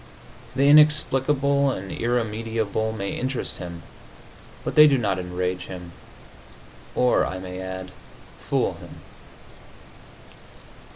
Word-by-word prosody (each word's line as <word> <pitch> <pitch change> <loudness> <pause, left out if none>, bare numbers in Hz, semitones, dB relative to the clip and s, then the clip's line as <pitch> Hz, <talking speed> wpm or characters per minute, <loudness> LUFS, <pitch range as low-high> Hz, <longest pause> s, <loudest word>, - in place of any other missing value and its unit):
The 135 +2 +3
inexplicable 140 -2 +4
and 95 -7 -4
irremediable 110 -2 -1
may 100 -3 -4
interest 130 0 -3
him, 85 -2 -8 0.8
but - - -3
they 150 0 +8
do 140 -2 +3
not 100 -6 0
enrage 90 0 -3
him, 90 -2 -8 1.0
or, 125 -1 +3
I 95 - -3
may 90 0 -7
add, 95 0 -6 0.5
fool - - 0
him. - - -12
110 Hz, 105 wpm, -24 LUFS, 95-135 Hz, 1.0 s, they